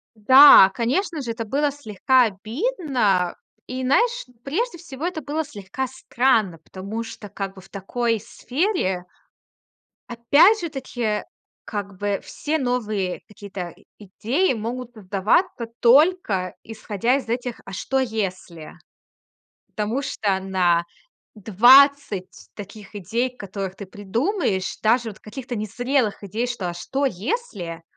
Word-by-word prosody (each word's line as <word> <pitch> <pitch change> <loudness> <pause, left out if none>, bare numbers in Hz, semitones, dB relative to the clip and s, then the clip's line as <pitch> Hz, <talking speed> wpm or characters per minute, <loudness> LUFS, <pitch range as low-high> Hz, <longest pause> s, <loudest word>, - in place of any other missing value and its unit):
Да, 260 -2 +9
конечно 295 - -1
же, 235 -3 -4
это 230 0 -5
было 285 +6 0
слегка 260 -1 +2
обидно. 225 - 0 0.3
И, 255 +1 -5
знаешь, 480 - +2 0.2
прежде 345 - -2
всего 310 -1 -6
это 340 -3 -4
было 300 +4 -2
слегка 205 +6 -5
странно, 240 -8 +1
потому 200 +7 -6
что, 210 -2 -10
как 195 -1 -5
бы, 190 - -12
в - - -19
такой 225 +3 -2
сфере 245 - -2 1.0
опять 285 - +5
же 335 - -3
таки, 245 -6 -3 0.4
как 200 -2 -5
бы, 205 0 -1
все 310 +2 -3
новые 215 - -2
какие-то 195 -4 -8 0.3
идеи 240 - 0
могут 245 +2 -5
создаваться 220 - 0
только 240 - +3
исходя 225 +2 -1
из 270 -4 -4
этих 245 0 -3
"а 195 - -9
что 265 +7 -1
если". 185 -9 -4 1.0
Потому 220 +6 -2
что 200 -7 -1
на 180 -3 +1 0.5
20 220 -1 +4
таких 205 0 -11
идей, 235 +6 -2
которых 195 -2 -6
ты 200 - -8
придумаешь, 205 - -2
даже 230 +1 +2
вот 200 - -13
каких-то 245 +2 -7
незрелых 230 +2 -1
идей, 215 +5 -2
что 220 -7 -4
"а - - -7
что 270 +11 -2
если", 195 - -4
230 Hz, 125 wpm, -23 LUFS, 195-270 Hz, 1.0 s, Да